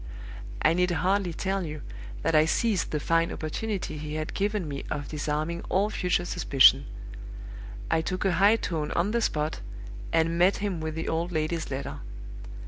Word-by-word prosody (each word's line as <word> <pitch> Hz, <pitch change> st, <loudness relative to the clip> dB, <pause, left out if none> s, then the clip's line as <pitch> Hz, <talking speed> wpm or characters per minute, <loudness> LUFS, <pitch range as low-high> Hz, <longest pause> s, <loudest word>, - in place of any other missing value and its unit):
"I 155 Hz, -, +5 dB
need 180 Hz, +1 st, +2 dB
hardly 180 Hz, +2 st, +1 dB
tell 190 Hz, +3 st, -2 dB
you 155 Hz, -2 st, -6 dB, 0.4 s
that 165 Hz, -, +1 dB
I 155 Hz, 0 st, +6 dB
seized 205 Hz, +4 st, +1 dB
the 150 Hz, -, -1 dB
fine 165 Hz, +2 st, +1 dB
opportunity 185 Hz, +1 st, -3 dB
he 150 Hz, 0 st, -5 dB
had 155 Hz, 0 st, -3 dB
given 205 Hz, -3 st, -1 dB
me 140 Hz, -1 st, -5 dB
of 145 Hz, -2 st, -4 dB
disarming 155 Hz, +3 st, -2 dB
all 200 Hz, +3 st, +2 dB
future 180 Hz, -2 st, 0 dB
suspicion. 135 Hz, -6 st, +5 dB, 1.0 s
I 160 Hz, -, +3 dB
took 185 Hz, +4 st, -3 dB
a 195 Hz, -, +3 dB
high 200 Hz, +5 st, +5 dB
tone 160 Hz, -8 st, -2 dB
on 180 Hz, +5 st, +1 dB
the 235 Hz, +1 st, +1 dB
spot, 155 Hz, -6 st, -1 dB, 0.5 s
and 165 Hz, +1 st, +2 dB
met 185 Hz, +3 st, +4 dB
him 200 Hz, -5 st, -2 dB
with 160 Hz, 0 st, -3 dB
the 160 Hz, -, -4 dB
old 165 Hz, +2 st, -1 dB
lady's 160 Hz, 0 st, -1 dB
letter. 135 Hz, 0 st, -4 dB
165 Hz, 170 wpm, -27 LUFS, 155-185 Hz, 1.0 s, I